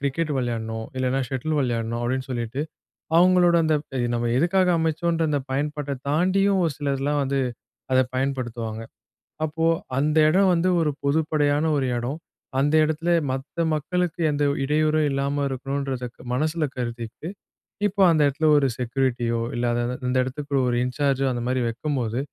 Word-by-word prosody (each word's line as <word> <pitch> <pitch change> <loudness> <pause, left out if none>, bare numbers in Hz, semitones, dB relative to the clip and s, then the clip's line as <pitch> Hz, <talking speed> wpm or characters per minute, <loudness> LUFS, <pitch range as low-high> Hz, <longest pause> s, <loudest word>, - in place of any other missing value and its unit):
Cricket 145 +3 -1
விளையாடணும், 110 -2 -3
இல்லனா 130 +1 0
shuttle 145 +3 -2
விளையாடணும்" 115 -2 -1
அப்படின்னு 130 +2 -1
சொல்லிட்டு, 120 +2 -3 0.6
அவங்களோட 180 -1 +5
அந்த 155 -1 +2
ப - - -18 0.2
நம்ம 120 0 -1
எதுக்காக 180 +5 +3
அமைச்சோன்ற, 165 +1 0
அந்த 145 -1 +1
பயன்பாட்டை 145 0 -2
தாண்டியும், 190 +5 +2
ஒரு 160 - -1
சிலர்லாம் 145 0 0
வந்து, 135 0 0 0.5
அத 130 - +5 0.2
பயன்படுத்துவாங்க. 120 -4 -3 0.6
அப்போ 160 +1 -2 0.3
அந்த 150 +2 +1
எடம் 190 +3 +4
வந்து, 170 +2 +2
ஒரு 150 - +1
பொதுப்படையான 150 0 +1
ஒரு 135 - 0
இடோ. 120 +2 -2 0.5
அந்த 145 +2 +2
இடத்தில, 155 +2 -1 0.2
மத்த 135 +2 -5 0.2
மக்களுக்கு 175 +3 -2
எந்த 145 0 0
ஓரு 140 - -3
இடையூறும் 155 +1 +2
இல்லாம 140 +1 -1
இருக்கணுன்றத, 135 -1 -3 0.3
மனசுல 155 +4 0
கருதிட்டு, 120 +3 -5 0.6
இப்போ 200 0 0
அந்த 155 -2 +2
இடத்துல 155 +3 +1
ஒரு 140 - +2
செக்யூரிட்டியோ, 120 -2 0
இல்ல 120 - -2
அத 120 - 0
அத 125 - -2
இந்த 130 +1 +1
இடத்துக்கு 140 +2 -5
ஒரு 120 - +1
இன்சார்ஜோ, 135 +1 0
அந்தமாரி 125 +1 -1
வைக்கும்போது, 125 -2 -2
140 Hz, 145 wpm, -24 LUFS, 125-155 Hz, 0.6 s, அவங்களோட